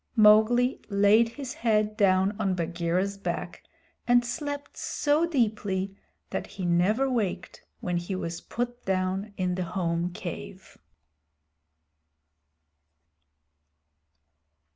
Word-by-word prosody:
Mowgli 220 +3 +5
laid 205 +3 +4
his 265 +1 -7
head 215 -2 +1
down 195 0 +3
on 190 -3 +1
Bagheera's 175 +3 -1
back - - -4 0.5
and 245 0 +4
slept 285 +3 -5
so 300 +3 +1
deeply 205 - -1 0.4
that - - -3
he 185 - -6
never 185 +10 +2
waked 230 -8 -2 0.2
when 180 -1 -1
he 175 +3 -3
was 170 -2 -4
put 245 +1 -4
down 190 +2 -1
in 180 -1 0
the 185 0 -2
home 170 0 0
cave. 190 +2 -8
200 Hz, 100 wpm, -27 LUFS, 185-235 Hz, 0.5 s, Mowgli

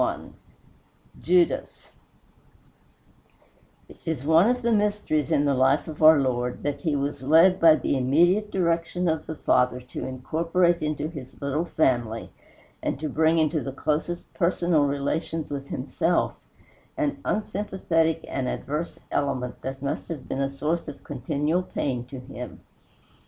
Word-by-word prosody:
XXI - - -1 0.9
JUDAS 175 0 +1 2.0
It - - -16
is 160 -5 -3
one 165 +7 +5
of 250 0 0
the 235 - +2
mysteries 205 - +1
in 145 - +2
the 140 - +2
life 135 +3 +2
of 155 -1 -8
our 155 -1 +8
Lord 125 -2 -1
that 145 -1 -2
he 155 -4 0
was 140 0 -2
led 165 +7 +5
by 165 -2 +7
the 140 - -1
immediate 175 +11 +3
direction 175 -1 0
of 160 -1 -1
the 160 - -4
Father 125 -3 +2
to 125 0 -7
incorporate 165 +7 +1
into 150 0 -2
his 145 -6 -10
little 145 +3 -1
family, 120 -9 0 0.5
and - - -2
to 155 0 -3
bring 160 +3 +2
into 155 -1 +2
the 135 - -4
closest 155 +5 -3
personal 170 -3 +2
relations 150 +3 -2
with 140 -1 -4
himself, 165 +7 0 0.6
an 300 -3 -1
unsympathetic 190 -6 0
and 130 -2 -2
adverse 150 +6 -3
element 130 -3 -2
that 135 +1 -6
must 140 - -3
have 155 -6 -6
been 135 - -2
a 135 - 0
source 150 +5 -2
of 150 - -9
continual 145 +5 -1
pain 130 -8 -3
to 130 +1 -8
him. 125 -5 -9
155 Hz, 145 wpm, -25 LUFS, 135-170 Hz, 2.0 s, our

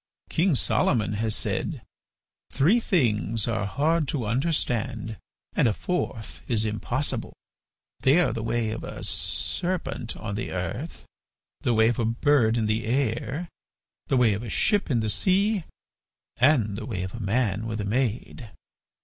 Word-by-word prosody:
King 170 -1 +3
Solomon 110 -3 +2
has 110 +1 0
said: - - -2 0.7
'Three 165 - +4
things 115 - +1
are 110 -3 0
hard 150 +7 +1
to 130 -4 -2
understand 120 - -1 0.4
and - - +3
a 110 - +2
fourth 115 - -3
is 110 -3 +2
impossible: 105 -5 -2 0.7
they 135 +5 +4
are 175 - +2
the 115 - -3
way 115 -1 0
of 110 - -5
a - - -6
serpent 110 - -2
on 105 -2 -5
the 100 - -3
earth, 95 - -4 0.5
the 120 - +1
way 110 +1 +5
of 120 - -1
a 115 - +2
bird 115 0 +3
in 110 - +1
the 110 +1 0
air, 135 +6 -1 0.6
the 135 - +2
way 120 -4 +4
of 100 - -3
a 120 - -6
ship 205 - +2
in 120 -5 +2
the 110 - -1
sea, 195 - +2 0.7
and 120 -7 +3
the 110 - -6
way 95 -6 -3
of 95 - -5
a 115 - -6
man 110 0 0
with 110 -1 -3
a 105 - -2
maid! 115 +1 -2
115 Hz, 160 wpm, -26 LUFS, 110-140 Hz, 0.7 s, way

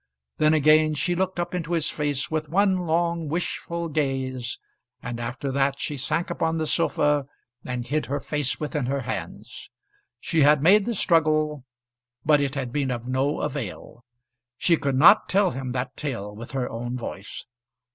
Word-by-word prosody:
Then 155 +1 +4
again 155 +1 +4
she 175 +4 0
looked 185 0 -1
up 175 +1 -2
into 175 -1 -3
his 165 -3 +1
face 145 0 -2
with 155 -1 -2
one 185 0 +2
long 170 0 0
wishful 170 +1 -3
gaze; 130 -5 -2 0.5
and 120 -1 -5
after 125 +4 -4
that 135 0 +1
she 150 - -3
sank 165 +6 -1
upon 165 -1 0
the 160 - -1
sofa 150 -3 +1 0.4
and 125 -1 -4
hid 150 +3 -1
her 145 +2 -1
face 145 -1 -1
within 150 -3 -2
her 140 +1 -1
hands. - - -6 0.5
She 165 -2 0
had 145 0 +5
made 195 +5 +5
the 235 - -1
struggle, 155 -5 +2 0.6
but 150 -1 +5
it 140 0 -1
had 130 -3 -3
been 140 -2 0
of 120 -1 -4
no 135 +3 0
avail. 125 -4 -5 0.5
She 170 - +3
could 140 -4 -1
not 185 +11 +6
tell 195 0 +3
him 130 0 -5
that 125 +1 -3
tale 115 -8 -4
with 115 +4 -9
her 130 -2 -1
own 120 +2 -4
voice. 100 -4 -7
145 Hz, 170 wpm, -25 LUFS, 130-165 Hz, 0.6 s, not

